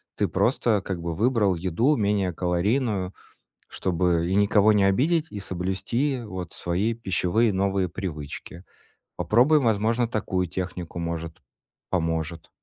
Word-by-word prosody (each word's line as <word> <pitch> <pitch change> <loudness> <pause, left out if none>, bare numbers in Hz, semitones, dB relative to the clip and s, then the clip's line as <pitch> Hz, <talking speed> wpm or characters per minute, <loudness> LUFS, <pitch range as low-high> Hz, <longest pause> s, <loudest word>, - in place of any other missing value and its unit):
ты - - +1
просто 115 -4 +1
как 95 -2 -4
бы 85 0 -3
выбрал 110 -3 +2
еду 95 - +1
менее 100 -4 +1
калорийную, 95 +3 0 0.6
чтобы 85 -2 0
и 95 - 0
никого 105 +1 +4
не 105 -1 +3
обидеть, 150 - +2
и 105 - -6
соблюсти 95 +9 -2
вот 95 -5 -6
свои 95 +6 -1
пищевые 110 +1 +1
новые 95 -1 0
привычки. 85 -1 -7 0.5
Попробуй, 130 +8 +4
возможно, 115 0 +1
такую 95 -5 -1
технику. 90 -1 -5
Может, 85 -1 -4 0.5
поможет. 80 -2 -2
95 Hz, 125 wpm, -25 LUFS, 90-110 Hz, 0.6 s, никого